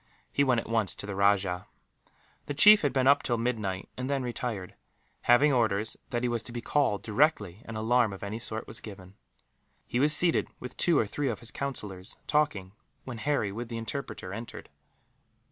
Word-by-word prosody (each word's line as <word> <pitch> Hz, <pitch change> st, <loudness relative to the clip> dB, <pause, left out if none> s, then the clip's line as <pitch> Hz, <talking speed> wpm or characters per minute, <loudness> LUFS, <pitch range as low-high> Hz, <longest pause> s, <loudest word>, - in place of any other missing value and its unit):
He 140 Hz, -, +2 dB
went 125 Hz, -4 st, +3 dB
at -, -, -7 dB
once 110 Hz, -3 st, 0 dB
to -, -, -6 dB
the 100 Hz, -, -5 dB
rajah. 95 Hz, -2 st, +1 dB, 0.8 s
The 145 Hz, -, -3 dB
chief 210 Hz, +6 st, +8 dB
had 145 Hz, -, +1 dB
been 130 Hz, 0 st, +1 dB
up 140 Hz, +1 st, +5 dB
till 120 Hz, -2 st, -1 dB
midnight, 110 Hz, -6 st, -2 dB
and 130 Hz, +1 st, -4 dB
then 140 Hz, -2 st, 0 dB
retired; 120 Hz, -6 st, -4 dB, 0.6 s
leaving 140 Hz, +4 st, +6 dB
orders 110 Hz, -3 st, +1 dB
that 120 Hz, 0 st, -2 dB
he -, -, +2 dB
was 120 Hz, -2 st, -1 dB
to 110 Hz, -, -7 dB
be 120 Hz, -, -4 dB
called, 125 Hz, -4 st, 0 dB
directly 105 Hz, -, +1 dB
an 115 Hz, -, -7 dB
alarm 115 Hz, +1 st, +2 dB
of 95 Hz, -, -9 dB
any 105 Hz, +3 st, -4 dB
sort 110 Hz, -1 st, -4 dB
was -, -, -6 dB
given. 95 Hz, -3 st, -11 dB, 0.7 s
He 120 Hz, -, -2 dB
was 145 Hz, +3 st, +4 dB
seated 165 Hz, +2 st, +5 dB
with 125 Hz, -, -8 dB
two 170 Hz, -4 st, +3 dB
or 115 Hz, -, +3 dB
three 135 Hz, +7 st, -2 dB
of 110 Hz, -, -2 dB
his 120 Hz, -, -4 dB
councillors, 105 Hz, -9 st, -5 dB
talking, 105 Hz, -11 st, 0 dB, 0.3 s
when 120 Hz, -3 st, -7 dB
Harry, 140 Hz, -7 st, 0 dB
with 115 Hz, +3 st, -6 dB
the 115 Hz, -, -4 dB
interpreter, 115 Hz, -5 st, -5 dB
entered. 115 Hz, +3 st, -8 dB
115 Hz, 195 wpm, -28 LUFS, 100-135 Hz, 0.8 s, chief